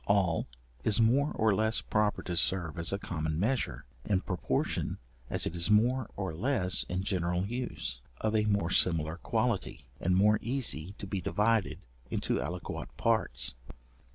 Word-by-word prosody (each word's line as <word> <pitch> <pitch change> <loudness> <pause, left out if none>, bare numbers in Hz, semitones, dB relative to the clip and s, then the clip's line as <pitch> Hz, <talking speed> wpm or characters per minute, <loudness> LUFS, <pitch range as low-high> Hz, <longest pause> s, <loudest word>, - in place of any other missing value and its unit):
All 95 -5 +2 0.4
is 110 +1 +4
more 130 +6 +4
or 110 -2 +3
less 110 +3 +1
proper 105 -1 0
to 90 - -3
serve 85 -1 0
as 85 - 0
a 100 - 0
common 80 -5 -3
measure, 105 - -1 0.2
in 95 -3 +1
proportion 90 -3 -1 0.3
as - - 0
it - - -3
is 85 +2 +2
more 120 +4 +3
or 95 -4 -3
less 95 - +1
in 90 +1 -1
general 90 -1 0
use, 110 - -4 0.2
of 110 0 0
a 105 -1 +3
more 100 -5 +1
similar 80 -3 +3
quality, 75 -4 -1
and 90 +1 +2
more 105 +2 +5
easy 115 - -2
to - - -6
be 95 -1 -3
divided 105 +4 +1 0.3
into - - -1
aliquot 90 0 -4
parts. - - +1
100 Hz, 155 wpm, -31 LUFS, 85-110 Hz, 0.4 s, more